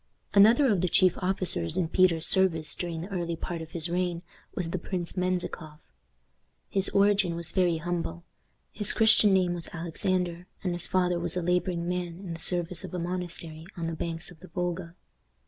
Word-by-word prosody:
Another 225 +8 +6
of 190 -4 +1
the 180 - +1
chief 185 +1 +5
officers 180 - -2
in 180 -3 +1
Peter's 170 -2 +3
service 165 -5 +3
during 170 -2 -4
the 175 - -6
early 170 -4 -2
part 165 +1 -5
of 160 - -8
his 165 -1 -1
reign 175 0 -2 0.3
was 165 -2 -3
the 185 - -2
Prince 175 0 -4
Menzikoff. 180 - -4 0.8
His 195 -1 +3
origin 200 -3 +3
was 170 0 -1
very 180 -3 +2
humble. 170 0 -4 0.5
His 210 -1 +3
Christian 220 -2 +5
name 185 -2 +3
was 170 -1 -6
Alexander, 175 +1 -2 0.2
and 180 -2 -1
his 175 -1 +2
father 180 -2 +1
was 170 0 -3
a 180 - -1
laboring 180 0 0
man 175 -1 -3
in 185 -3 -7
the 165 - -8
service 175 0 +2
of - - -7
a - - -2
monastery 170 -2 -5
on 170 - -3
the 165 - -3
banks 165 +2 -4
of 170 - -15
the 185 - -13
Volga. 175 -1 -4
175 Hz, 185 wpm, -28 LUFS, 170-185 Hz, 0.8 s, Another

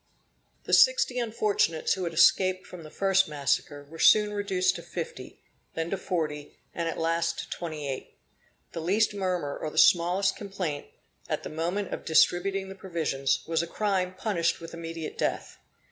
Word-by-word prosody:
The - - -4
sixty - - +5
unfortunates 215 -8 +1
who 190 -2 -3
had 170 - -3
escaped 185 +2 +4
from 180 - -10
the 155 - -10
first 195 +3 +2
massacre, 145 0 -1
were 165 +2 -12
soon 210 -1 +5
reduced 190 -2 +1
to - - -8
fifty, 165 -7 -7 0.3
then 165 +1 -3
to - - +1
forty, 155 -5 -3 0.2
and 170 -1 -2
at - - -5
last 165 0 0
to - - -6
twenty 155 -4 -5
eight. 135 -1 -6 0.5
The 165 - -5
least 205 +6 +2
murmur, 180 -7 -2
or 155 - -4
the - - -12
smallest 185 +3 +4
complaint, 185 -8 -4 0.4
at - - -2
the - - -5
moment 175 +5 -2
of - - -5
distributing 190 +4 +2
the 190 - -7
provisions, 165 -8 -1
was 165 0 0
a 170 - -4
crime 185 -1 -1
punished 185 -4 0
with 165 0 -10
immediate 165 -1 -6
death. - - -2
175 Hz, 170 wpm, -27 LUFS, 160-195 Hz, 0.5 s, sixty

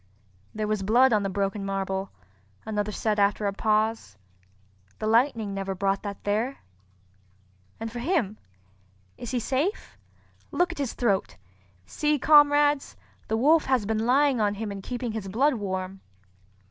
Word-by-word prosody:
"There 215 0 -2
was 215 -1 -1
blood 240 +6 +4
on 210 - +3
the 195 - -2
broken 195 +1 -2
marble," 195 0 -2 0.6
another 210 -1 -2
said 210 0 -1
after 205 +1 +2
a 200 - 0
pause, 215 - 0 0.8
"the - - -4
lightning 225 -2 +2
never 195 -1 -3
brought 195 +1 0
that 200 -2 -7
there. 220 +6 -1 1.2
And 225 0 -5
for 240 - -6
him—is 95 - -5
he 255 - -1
safe? 275 - -2 0.5
Look 355 0 +1
at 345 - -9
his 275 -4 -2
throat! 200 -6 0 0.5
See 295 - 0
comrades, 290 0 +4 0.3
the 220 - 0
wolf 305 +7 +4
has 255 -5 +1
been 220 +2 -1
lying 270 -1 +3
on 205 -1 +1
him 210 0 -4
and 200 -1 -6
keeping 245 +1 -4
his 215 -3 -5
blood 265 +10 +2
warm." 190 -3 -4
215 Hz, 145 wpm, -26 LUFS, 195-255 Hz, 1.2 s, blood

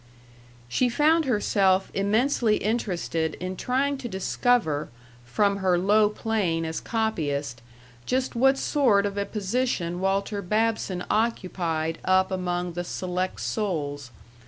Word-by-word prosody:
She 245 - +1
found 310 +6 +3
herself 195 -5 +2
immensely 215 +2 +2
interested 175 -7 -1
in 185 +1 -5
trying 270 +6 0
to 255 - -5
discover, 190 -5 0 0.4
from 200 +11 +1
her 185 -2 +2
low 205 +3 +4
plane 205 -7 -1
as 160 0 -4
copyist, 150 - -2 0.5
just 255 +1 0
what 270 +3 +4
sort 240 -10 +2
of 200 -1 -3
a 200 0 -2
position 200 -5 -1
Walter 195 +2 -1
Babson 210 -2 -1
occupied 175 -7 -1
up 185 +1 +3
among 180 -1 -2
the 175 +1 -3
select 185 +1 -3
souls. 145 - -3
195 Hz, 120 wpm, -25 LUFS, 175-225 Hz, 0.5 s, low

